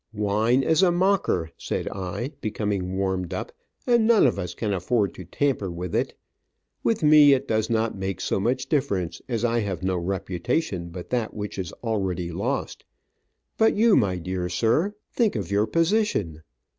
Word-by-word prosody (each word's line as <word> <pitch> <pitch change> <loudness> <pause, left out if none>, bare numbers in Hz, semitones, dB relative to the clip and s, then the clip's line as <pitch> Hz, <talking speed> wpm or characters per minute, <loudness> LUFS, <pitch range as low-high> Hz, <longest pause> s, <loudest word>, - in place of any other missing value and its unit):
"Wine 105 +5 +2
is 160 +4 +3
a 185 -2 +5
mocker," 175 - +1
said - - -3
I, 95 +7 -4
becoming 100 -4 -2
warmed 95 -2 -1
up, - - -5 0.3
"and 235 -3 +3
none 230 -7 +6
of 120 -6 +2
us 90 -2 -4
can 105 -3 -2
afford 100 +2 0
to 90 - -10
tamper 110 - -1
with 85 0 -5
it. - - 0 0.7
With 225 -6 +1
me, 150 -2 +7
it 130 - 0
does 110 -1 0
not 115 -1 0
make 95 0 -3
so - - -1
much 125 +5 0
difference, 115 - -1
as 115 -1 0
I 120 0 +1
have 95 -4 -3
no 95 -1 0
reputation 95 - -2
but 85 +1 -9
that 120 -3 -1
which 105 -2 -5
is 90 -3 -4
already 95 -6 -1
lost, - - -3 0.8
but 220 - +4
you, 220 -1 +5
my 100 -6 +2
dear 90 +1 -3
sir, 115 - +1 0.2
think 225 -4 +2
of 100 -3 -3
your 105 +2 +2
position. 165 - +1
105 Hz, 170 wpm, -25 LUFS, 95-140 Hz, 0.8 s, me